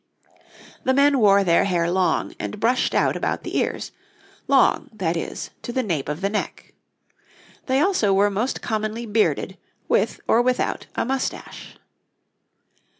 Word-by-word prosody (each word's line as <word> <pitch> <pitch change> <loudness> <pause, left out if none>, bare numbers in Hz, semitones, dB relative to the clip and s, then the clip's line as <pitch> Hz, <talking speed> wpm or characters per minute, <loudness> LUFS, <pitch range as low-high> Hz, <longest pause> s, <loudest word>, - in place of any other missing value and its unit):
The 260 - +2
men 280 0 +4
wore 200 -2 +5
their 170 -1 +3
hair 175 -3 +1
long 185 0 0
and 210 - -5
brushed 240 +4 +1
out - - +2
about - - -2
the - - -6
ears - - -2 0.6
long, 275 -2 +3
that 180 -6 -2
is, 165 - -5
to - - -5
the 255 +1 -1
nape 160 - -2
of 150 +4 -4
the 195 - +1
neck. 210 - -4 0.9
They 260 0 +2
also 340 - +2
were 200 +1 +3
most 220 +7 -2
commonly 215 +1 -2
bearded, 215 0 0 0.3
with - - +1
or 235 - +4
without 250 0 -1
a - - 0
moustache. 265 +1 -4
215 Hz, 150 wpm, -23 LUFS, 195-255 Hz, 0.9 s, wore